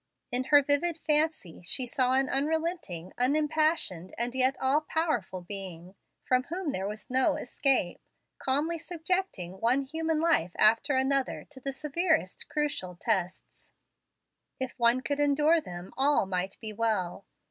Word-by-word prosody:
In 250 +1 0
her 290 0 +6
vivid 300 +4 +1
fancy, 300 - 0
she 250 +9 +1
saw 255 +1 +1
an 265 0 +2
unrelenting, 290 - -2
unimpassioned, 300 - +1
and 240 +1 0
yet 260 +1 +2
all 270 +3 +2
powerful 305 - -2
Being, 180 -1 -7 0.3
from 255 0 +2
whom 345 0 -3
there 190 -5 -2
was 215 +5 -7
no 260 +1 +3
escape, 250 -8 0 0.4
calmly 300 +5 0
subjecting 330 - -3
one 250 +4 +2
human 320 +3 -1
life 315 - +2
after 230 +6 +4
another 265 0 0
to 270 - -9
the 275 +1 -3
severest 300 - -1
crucial 290 - -2
tests. 185 -5 -3 0.9
If 260 -1 -3
one 235 +2 +4
could 285 +2 -2
endure 295 +3 +3
them, 175 -5 -9
all 275 -4 +3
might 190 0 -2
be 215 -2 -4
well. 205 -4 -1
265 Hz, 140 wpm, -29 LUFS, 200-305 Hz, 0.9 s, her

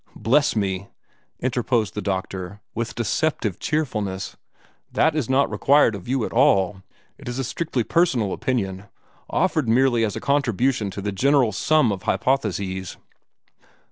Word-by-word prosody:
"Bless 145 +5 +2
me!" 100 -2 -1 0.5
interposed 120 -4 0
the - - -4
doctor, 95 0 -4
with 115 +1 -4
deceptive 115 - -1
cheerfulness, 105 -11 -2 0.6
"that 160 -1 +2
is 145 -7 -1
not 135 +1 +3
required 140 -4 +4
of 100 -3 -8
you 130 -3 0
at - - -6
all. 95 0 +3 0.4
It - - -7
is 120 - -4
a 135 - -1
strictly 130 -1 -2
personal 130 - +1
opinion, 100 -7 -2 0.4
offered 155 -9 +1
merely 120 0 +3
as 105 -3 -1
a - - -3
contribution 130 -5 +1
to 100 - -6
the 105 - -1
general 130 +3 +3
sum 140 +3 +2
of 95 -2 -4
hypotheses." 95 -9 -1
115 Hz, 140 wpm, -23 LUFS, 100-135 Hz, 0.6 s, required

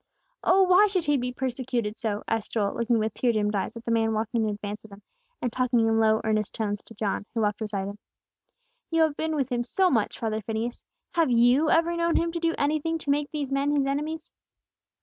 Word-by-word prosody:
"Oh, 380 +1 +5
why 370 +3 +6
should 375 -4 -1
He 295 0 +3
be 250 -2 -1
persecuted 250 -4 -2
so?" 215 -3 -3
asked 225 -2 -2
Joel, 205 -3 0
looking 235 0 +1
with 220 -1 -1
tear 245 - +1
dimmed 210 -1 0
eyes 205 +3 -2
at 230 - -9
the 230 - -1
man 225 -1 +2
walking 220 +2 -1
in - - 0
advance 205 0 -5
of 220 - -13
them, 200 0 -14 0.4
and 245 -2 -1
talking 250 -1 +2
in 225 0 +2
low 220 0 +3
earnest 215 -1 -1
tones 205 -2 -2
to 225 - -14
John, 205 0 -2
who 225 - +1
walked 210 -1 0
beside 205 -3 -3
Him. 200 +1 -8 0.9
"You 330 -1 +3
have 310 -2 +1
been 315 +1 -2
with 275 -3 -1
Him 240 -1 0
so 370 +9 +2
much, 225 -6 0
father 220 -1 -2
Phineas. 225 +3 -4 0.3
Have 330 -4 +2
you 245 +6 +4
ever 335 +1 +3
known 335 0 +1
Him 335 0 +1
to 335 - -3
do 330 0 0
anything 310 +3 0
to 290 -3 -2
make 285 0 0
these 290 -3 -4
men 280 +2 +1
His 280 -1 +2
enemies?" 300 +3 -3
240 Hz, 230 wpm, -26 LUFS, 220-300 Hz, 0.9 s, why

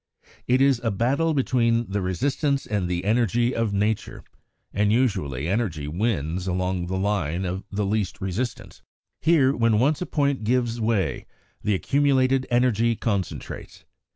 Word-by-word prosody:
It 125 +1 +3
is 135 -3 +3
a 115 - +1
battle 135 +10 +1
between 120 -3 +1
the 100 0 -1
resistance 140 - 0
and 100 -4 -1
the 90 +1 -2
energy 120 +2 +2
of 115 -2 0
nature, 105 +2 -1 0.5
and 105 +1 +2
usually 95 - 0
energy 90 -8 -1
wins 90 -1 -1
along 90 -1 -1
the 95 +1 -2
line 95 -3 -1
of 95 +2 -3
the 100 0 -1
least 100 -2 -1
resistance. 95 +6 -4 0.4
Here, 145 -4 +4
when 115 -2 +2
once 140 +8 +2
a 180 - -2
point 140 -5 0
gives 120 0 0
way, 110 -6 0 0.4
the 105 - +1
accumulated 135 +2 +2
energy 120 -2 +2
concentrates. 100 -5 -4
110 Hz, 145 wpm, -24 LUFS, 95-125 Hz, 0.5 s, Here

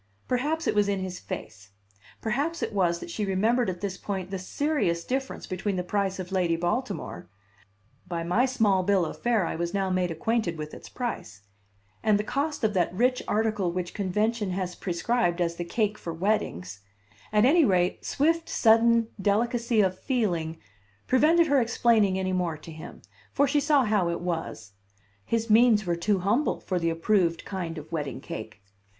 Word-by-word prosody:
Perhaps 295 +6 0
it - - +2
was 205 -1 +2
in 200 - +1
his 185 -1 -5
face; 110 -2 -8 0.5
perhaps 285 +10 -1
it - - -3
was 175 -4 +2
that 340 - -8
she 215 - -3
remembered 215 +4 +1
at 180 -1 -5
this 195 -2 -4
point 190 -2 -4
the 195 - -3
serious 185 - -1
difference 265 +1 -3
between 190 +1 -2
the 180 - -1
price 195 +1 -1
of 185 0 -6
Lady 180 -3 +1
Baltimore 195 - -3 0.8
(by 170 -2 -3
my 210 +10 +2
small 215 -7 +2
bill 190 -1 +2
of - - -7
fare 230 -6 +2
I - - -3
was 170 +3 -3
now 195 -1 0
made 185 -1 +1
acquainted 180 0 -1
with 150 0 -6
its - - -10
price) 105 - -5 0.6
and 215 -2 +3
the 210 - -1
cost 285 +5 -2
of 215 -1 +2
that 180 -3 +1
rich 250 +7 +1
article 215 -4 0
which 175 0 -4
convention 210 +2 0
has 180 -1 -3
prescribed 180 0 0
as 170 -1 0
the 175 - -2
cake 210 +4 -1
for 170 - -5
weddings; 160 - -2 0.5
at 210 +1 +4
any 320 +5 +5
rate, 180 -6 +1
swift, 325 +3 +1
sudden 230 0 +4
delicacy 230 +2 +2
of 185 -2 0
feeling 175 - -1 0.5
prevented 315 +6 +4
her 285 -4 +3
explaining 225 -4 +3
any 185 0 -1
more 175 -4 -1
to 155 +2 -11
him, 155 0 -10 0.3
for 285 +1 +2
she 290 +2 +2
saw 290 -2 +3
how 205 -5 +2
it 170 - -3
was: 160 - -4 0.6
his 230 0 0
means 220 -1 +5
were 175 -1 0
too 195 +4 +1
humble 210 +11 +1
for 185 -2 -2
the 165 -1 +1
approved 170 0 +1
kind 175 -4 -4
of 155 +1 -9
wedding 145 -5 -3
cake! 110 -5 -8
195 Hz, 180 wpm, -27 LUFS, 175-235 Hz, 0.8 s, any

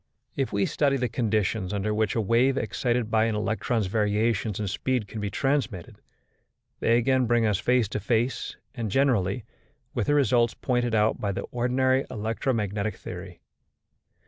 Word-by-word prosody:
If 135 -2 -1
we 100 -1 +1
study 140 -2 +1
the 125 -1 0
conditions 110 -4 0
under 105 +1 -1
which 105 -1 0
a 115 - +2
wave 120 +6 +3
excited 120 +1 -1
by 110 0 +3
an 115 -1 0
electron's 110 +1 0
variations 105 +1 0
in 105 - -2
speed 125 +3 -1
can 110 +1 -6
be 100 - -2
transmitted, 120 - -2 0.8
they 115 - +3
again 130 +1 +2
bring 120 -1 +3
us 105 -3 +1
face 125 -3 +2
to 105 - -3
face, 115 +5 -1 0.2
and 115 -5 -3
generally, 115 -4 +1 0.5
with 120 -5 -1
the 145 - +3
results 120 -5 +3
pointed 120 -3 0
out 110 +1 +2
by 100 - 0
the 95 - -3
ordinary 130 +2 +1
electromagnetic 110 -2 -2
theory. 90 0 -9
115 Hz, 160 wpm, -26 LUFS, 105-125 Hz, 0.8 s, wave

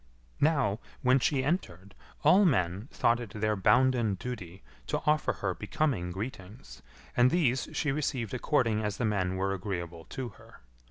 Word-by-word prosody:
Now, 140 -9 +2 0.2
when 130 +1 +5
she 130 +1 +1
entered, 100 - -3 0.3
all 180 +7 +6
men 100 - +1
thought 115 0 +2
it 115 -4 -8
their 110 0 +1
bounden 120 +1 +3
duty 95 - -7 0.2
to - - 0
offer 150 0 +2
her 95 -2 -2
becoming 120 - -1
greetings, 95 - -8 0.3
and 125 +1 +5
these 135 -6 +1
she 150 - 0
received 130 -6 -2
according 120 -4 +1
as 105 -2 -2
the 120 - -1
men 95 -3 0
were 95 +1 0
agreeable 85 -4 -5
to 130 -2 -5
her. - - -17
115 Hz, 155 wpm, -29 LUFS, 95-130 Hz, 0.3 s, all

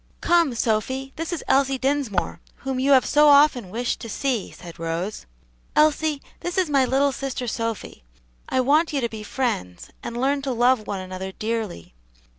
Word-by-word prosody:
"Come, 340 -7 +3
Sophy, 260 +5 -1
this 330 +2 -4
is 345 - -3
Elsie 270 0 +3
Dinsmore, 265 -8 -1 0.3
whom 265 -1 -1
you 275 +2 +4
have 260 - +5
so 300 0 +5
often 280 -8 +5
wished 235 +5 -2
to 230 - -8
see," 245 -2 -1
said 170 -2 -12
Rose. 165 - -4 0.5
"Elsie, 305 -1 +2 0.2
this 350 +1 -4
is 365 -5 +1
my 275 -2 +4
little 275 +2 +2
sister 265 -1 -4
Sophy. 230 - -4 0.5
I 260 - +2
want 300 +6 +3
you 280 - +1
to 235 - -1
be 220 -1 -7
friends, 205 - -3
and 235 0 -5
learn 275 +2 +1
to 270 -2 -2
love 240 -2 +2
one 195 -2 -3
another 185 +1 -6
dearly. 215 - -4
255 Hz, 175 wpm, -23 LUFS, 215-280 Hz, 0.5 s, have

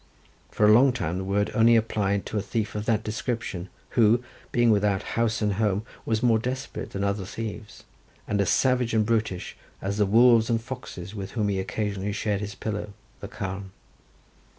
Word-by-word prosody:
For 105 - +2
a 105 - +7
long 130 +3 +6
time 90 -7 -2
the - - -3
word 100 +2 0
was - - -10
only 115 +1 +6
applied 100 -3 +1
to 110 - -4
a - - -1
thief 110 +1 -2
of 105 0 -4
that 110 -1 +2
description, 110 -5 -3 0.2
who, 115 0 +4 0.3
being 120 -1 +4
without 100 -2 +2
house 115 -1 0
and 105 -1 +2
home, 105 0 0 0.2
was 110 +1 0
more 115 -2 +4
desperate 130 +3 -4
than 100 - -4
other 100 0 0
thieves, 105 +1 -7 0.4
and 100 -1 +1
as 95 - +1
savage 125 -3 +2
and 110 -1 +3
brutish 110 -5 -1 0.2
as 100 +1 -3
the 105 - +3
wolves 115 +1 +5
and 115 -1 +2
foxes 115 -6 -8
with 100 -2 -6
whom 105 -3 0
he 95 -1 0
occasionally 100 0 -2
shared 105 -1 -1
his 105 0 -5
pillow, 105 -1 -4 0.3
the - - -7
carn. 95 +1 -5
105 Hz, 190 wpm, -26 LUFS, 100-115 Hz, 0.4 s, a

